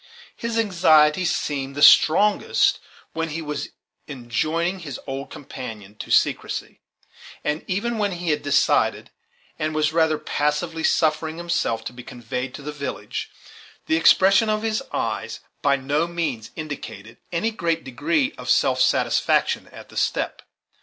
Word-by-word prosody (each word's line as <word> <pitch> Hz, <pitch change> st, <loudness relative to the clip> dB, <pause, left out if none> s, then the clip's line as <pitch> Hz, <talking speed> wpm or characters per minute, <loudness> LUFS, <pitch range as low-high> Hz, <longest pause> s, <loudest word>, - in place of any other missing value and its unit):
His 230 Hz, 0 st, -3 dB
anxiety 170 Hz, -6 st, +4 dB
seemed 140 Hz, -5 st, -2 dB
the 145 Hz, -, 0 dB
strongest 205 Hz, +6 st, +5 dB, 0.3 s
when 165 Hz, 0 st, -2 dB
he 155 Hz, +2 st, -4 dB
was 150 Hz, -1 st, -4 dB, 0.4 s
enjoining 155 Hz, +8 st, -2 dB
his 145 Hz, -7 st, -7 dB
old 135 Hz, 0 st, -5 dB
companion 110 Hz, -7 st, -9 dB
to -, -, -8 dB
secrecy; -, -, 0 dB, 0.6 s
and 150 Hz, +1 st, -1 dB
even 220 Hz, +5 st, -1 dB
when 205 Hz, -2 st, 0 dB
he 175 Hz, -2 st, -2 dB
had 150 Hz, 0 st, 0 dB
decided, 145 Hz, 0 st, +2 dB, 0.5 s
and 155 Hz, 0 st, -2 dB
was 155 Hz, 0 st, +1 dB
rather 160 Hz, -1 st, +3 dB
passively 160 Hz, +3 st, -1 dB
suffering 160 Hz, 0 st, +1 dB
himself 170 Hz, -10 st, -1 dB
to -, -, -5 dB
be 125 Hz, -, -9 dB
conveyed 125 Hz, +2 st, -5 dB
to 145 Hz, -, -9 dB
the 150 Hz, -, -4 dB
village, 145 Hz, -1 st, -5 dB, 0.6 s
the 160 Hz, -, +1 dB
expression 195 Hz, +6 st, +5 dB
of 215 Hz, 0 st, 0 dB
his 220 Hz, +2 st, 0 dB
eyes -, -, -3 dB, 0.2 s
by 140 Hz, -1 st, +3 dB
no 145 Hz, +5 st, 0 dB
means 155 Hz, -10 st, -3 dB
indicated 115 Hz, -8 st, -7 dB
any 200 Hz, +7 st, 0 dB
great 170 Hz, -6 st, -1 dB
degree 290 Hz, -, 0 dB
of -, -, -7 dB
self -, -, +3 dB
satisfaction -, -, +2 dB
at -, -, -13 dB
the -, -, -11 dB
step. -, -, -1 dB
155 Hz, 145 wpm, -23 LUFS, 140-175 Hz, 0.6 s, strongest